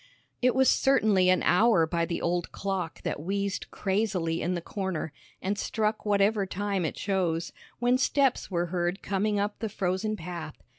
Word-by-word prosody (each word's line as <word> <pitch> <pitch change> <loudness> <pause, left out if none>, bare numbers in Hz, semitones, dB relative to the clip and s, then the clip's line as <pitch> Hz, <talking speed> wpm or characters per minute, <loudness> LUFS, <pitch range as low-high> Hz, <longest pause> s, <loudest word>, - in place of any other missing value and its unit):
It 250 -1 +3
was 265 0 +4
certainly 215 -9 +4
an 185 - +3
hour 210 -3 +4
by 170 +1 0
the 170 - -3
old 175 0 -1
clock 190 -4 -3
that - - -2
wheezed 200 +3 -2
crazily 190 -5 -1
in 180 +2 0
the - - -1
corner, 185 -5 -4 0.3
and 205 +2 -1
struck 215 -1 -1
whatever 200 0 +2
time 195 -1 -1
it - - -3
chose, 175 -4 -1 0.2
when 245 +2 +2
steps 270 0 +2
were 175 -2 0
heard 175 +2 -1
coming 205 +1 0
up 205 +1 -2
the 220 - -2
frozen 195 +2 -1
path. 170 -4 -7
195 Hz, 165 wpm, -28 LUFS, 175-215 Hz, 0.3 s, was